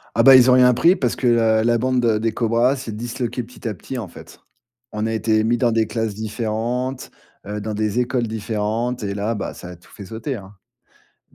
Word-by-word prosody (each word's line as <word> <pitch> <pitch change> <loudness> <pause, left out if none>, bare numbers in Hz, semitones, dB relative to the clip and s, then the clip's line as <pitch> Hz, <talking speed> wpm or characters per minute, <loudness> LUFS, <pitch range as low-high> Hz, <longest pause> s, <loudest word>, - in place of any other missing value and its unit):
Ah, 115 - +4
bah, 135 +2 +9
ils 130 0 +6
ont 125 - +6
rien 125 -1 +5
pris, 170 +8 +4
parce 125 - -1
que 130 - -2
la 115 -2 +3
la 120 0 +2
bande, 130 0 0
heu, 110 -2 +2
des 115 -1 0
cobras 120 +3 +2
s'est 120 -4 -7
disloquée 120 +2 -4
petit 120 +1 -12
à 110 - -1
petit, 125 +6 -8
en 110 -7 -5
fait. - - -14 0.5
On 105 +1 -2
a 110 - -2
été 110 -1 +1
mis 120 +2 +1
dans 120 -1 +1
des 110 -1 +2
classes 110 -2 -2
différentes, 115 +4 -3 0.4
heu, 105 0 -5
dans 110 - -4
des 105 +2 -1
écoles 125 -1 0
différentes. 110 +2 -2
Et 100 -1 -3
là, 105 +3 -2
bah, 105 - -5
ça 90 - -10
a 90 - -9
tout 85 - -23
fait 100 - -11
sauter, 115 +6 -5
hein. 95 -1 -11 0.8
Et - - -24
115 Hz, 235 wpm, -21 LUFS, 110-125 Hz, 0.8 s, bah